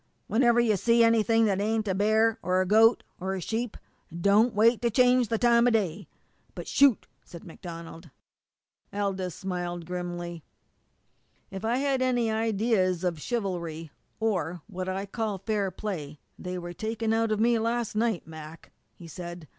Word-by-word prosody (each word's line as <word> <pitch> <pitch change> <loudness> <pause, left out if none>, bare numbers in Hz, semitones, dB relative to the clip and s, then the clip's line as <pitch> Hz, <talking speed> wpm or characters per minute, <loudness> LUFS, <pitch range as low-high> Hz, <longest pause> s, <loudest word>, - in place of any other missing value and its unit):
"Whenever 240 +1 +3
you 230 -3 +3
see 235 +4 +3
anything 225 0 +3
that 200 -2 +1
ain't 220 +1 0
a 190 - +1
bear, 220 +3 +2
or 185 0 +1
a 185 - +2
goat, 225 +4 +5 0.2
or 190 +1 -3
a - - -4
sheep, 225 +5 -3 0.4
don't 210 +5 +3
wait 225 +2 +4
to 235 - +2
change 250 +1 +4
the 225 - 0
time 235 +1 +4
o' - - +6
day 200 -5 -1 0.5
but - - -7
shoot!" 275 -5 +4 0.2
said 170 - -12
MacDonald. 165 -1 -10 0.8
Aldous 195 -3 -2
smiled 175 -3 -4
grimly. 175 -1 -5 1.1
"If 195 +1 -7
I 230 +3 +1
had 270 -1 0
any 245 -3 +1
ideas 215 -5 +1
of 170 -4 -2
chivalry, 170 - -4 0.3
or 180 -7 -1
what 185 -2 -5
I 190 +1 -3
call 215 0 -3
fair 200 0 -1
play, 165 -7 -6 0.2
they 180 0 -5
were 175 0 -6
taken 220 +2 -2
out 225 0 +1
of 215 - 0
me 230 +1 +3
last 230 -1 -1
night, 220 -5 0
Mac," 160 0 -11 0.2
he 170 - -12
said. 175 -1 -8
205 Hz, 160 wpm, -27 LUFS, 180-225 Hz, 1.1 s, o